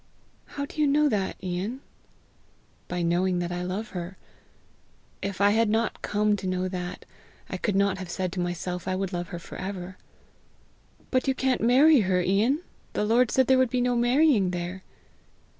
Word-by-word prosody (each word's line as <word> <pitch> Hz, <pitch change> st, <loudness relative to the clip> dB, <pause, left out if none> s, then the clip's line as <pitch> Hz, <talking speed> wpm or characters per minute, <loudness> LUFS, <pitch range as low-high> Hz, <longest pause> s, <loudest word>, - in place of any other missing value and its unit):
"How 280 Hz, -, -1 dB
do 305 Hz, -, -5 dB
you 300 Hz, -, +4 dB
know 295 Hz, +2 st, +4 dB
that, 200 Hz, -5 st, -1 dB
Ian?" 190 Hz, +8 st, -3 dB, 1.1 s
"By 180 Hz, -1 st, -2 dB
knowing 180 Hz, +2 st, +1 dB
that 175 Hz, 0 st, -2 dB
I 175 Hz, 0 st, -3 dB
love 190 Hz, +5 st, -4 dB
her. 180 Hz, +1 st, -6 dB, 1.0 s
If 195 Hz, -1 st, -4 dB
I 200 Hz, 0 st, +5 dB
had 225 Hz, +1 st, +3 dB
not 225 Hz, +1 st, 0 dB
come 210 Hz, 0 st, +1 dB
to 190 Hz, -, -5 dB
know 185 Hz, 0 st, -1 dB
that, 180 Hz, -1 st, -5 dB, 0.5 s
I -, -, -2 dB
could 205 Hz, -, -1 dB
not 195 Hz, -1 st, +2 dB
have 185 Hz, -2 st, -7 dB
said 185 Hz, 0 st, -2 dB
to 185 Hz, -, -4 dB
myself 175 Hz, 0 st, -3 dB
I 185 Hz, -, 0 dB
would 190 Hz, 0 st, -3 dB
love 175 Hz, 0 st, -3 dB
her 185 Hz, -3 st, -6 dB
for 170 Hz, -, -10 dB
ever." 185 Hz, -1 st, -6 dB, 1.1 s
"But 255 Hz, +1 st, +1 dB
you 265 Hz, -, +2 dB
can't 260 Hz, -1 st, 0 dB
marry 265 Hz, +6 st, +6 dB
her, 185 Hz, -3 st, +2 dB
Ian! 210 Hz, -, +2 dB, 0.3 s
The 210 Hz, -, 0 dB
Lord 230 Hz, +2 st, +3 dB
said 260 Hz, -, +3 dB
there 260 Hz, 0 st, +4 dB
would 260 Hz, -2 st, +3 dB
be 250 Hz, -, 0 dB
no 245 Hz, 0 st, +1 dB
marrying 240 Hz, -, +3 dB
there!" 180 Hz, +1 st, -4 dB
195 Hz, 185 wpm, -26 LUFS, 180-245 Hz, 1.1 s, marry